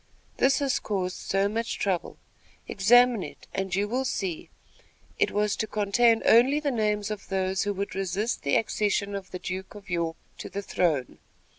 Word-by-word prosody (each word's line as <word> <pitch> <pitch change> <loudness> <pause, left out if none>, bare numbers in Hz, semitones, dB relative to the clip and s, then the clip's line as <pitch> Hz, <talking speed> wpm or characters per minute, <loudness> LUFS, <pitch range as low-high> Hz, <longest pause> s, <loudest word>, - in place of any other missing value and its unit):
"This 265 +1 +4
has 275 -2 +1
caused 185 -3 -2
so 195 +1 0
much 225 +2 -2
trouble. 190 -4 -2 0.5
Examine 240 +3 +5
it, - - -9
and 190 -1 -2
you 200 +1 +1
will 250 +5 -1
see 190 -9 -3 0.7
it - - +3
was 210 0 0
to 220 - -1
contain 225 +3 +2
only 255 +6 +5
the 295 -2 -1
names 210 -3 0
of 210 - -6
those 190 0 0
who 205 - 0
would 200 +1 -3
resist 195 +4 -2
the 140 - +1
accession 205 -2 0
of 195 -1 -5
the 185 - -5
Duke 190 +2 -6
of 200 -2 -11
York 165 -2 -1 0.2
to - - -6
the 200 +1 -5
throne." 155 -9 0
200 Hz, 175 wpm, -27 LUFS, 190-225 Hz, 0.7 s, Examine